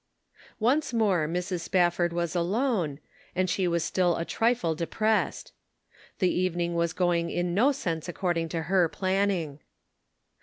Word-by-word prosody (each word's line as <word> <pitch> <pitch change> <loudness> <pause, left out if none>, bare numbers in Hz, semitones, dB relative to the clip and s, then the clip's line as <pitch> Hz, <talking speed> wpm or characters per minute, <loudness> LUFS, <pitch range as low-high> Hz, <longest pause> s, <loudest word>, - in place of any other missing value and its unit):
Once 255 +6 +1
more 195 -9 +2
Mrs. 180 +2 -2
Spafford 175 -1 +1
was 170 0 -2
alone, 180 - 0 0.4
and 185 0 +1
she 180 +2 0
was 170 -1 0
still 180 -2 +1
a 165 - -2
trifle 230 -7 +1
depressed. 215 +7 -1 0.6
The 185 -2 +2
evening 175 -1 0
was 170 -1 0
going 175 -1 +1
in 175 0 -1
no 240 +10 +4
sense 170 - -3
according 170 -2 -1
to 165 0 -3
her 175 0 +2
planning. 185 -6 -1
175 Hz, 140 wpm, -27 LUFS, 170-195 Hz, 0.6 s, no